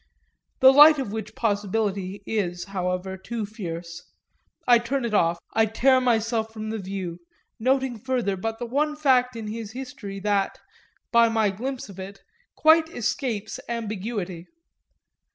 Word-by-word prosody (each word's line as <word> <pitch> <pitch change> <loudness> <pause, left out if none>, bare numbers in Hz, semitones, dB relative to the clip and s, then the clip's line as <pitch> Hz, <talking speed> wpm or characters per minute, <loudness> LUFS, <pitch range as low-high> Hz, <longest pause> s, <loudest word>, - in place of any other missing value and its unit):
The 265 +1 +9
light 300 +2 +9
of 265 -7 -3
which 220 0 -6
possibility 200 -2 -1
is, 180 -5 -2
however, 180 0 -2
too 220 +3 -4
fierce; 170 -5 -7 0.6
I 240 -1 +7
turn 250 +2 -2
it 230 - -3
off, 170 -4 +3 0.2
I 220 0 +3
tear 260 +4 +3
myself 225 -2 +1
from 215 -1 -5
the 220 - -3
view 185 -3 -5 0.4
noting 260 0 +1
further 245 -5 -1
but 225 +4 -3
the 240 - -4
one 295 +5 0
fact 255 -4 +3
in 225 -1 -6
his 220 0 -6
history 250 -6 -7
that, 200 -1 0 0.5
by 235 -1 +5
my 220 -3 +2
glimpse 255 +6 -5
of 195 -2 -12
it, 195 +1 -9 0.3
quite 320 +1 +5
escapes 225 -5 -3
ambiguity. 210 -6 -4
220 Hz, 145 wpm, -25 LUFS, 195-250 Hz, 0.6 s, The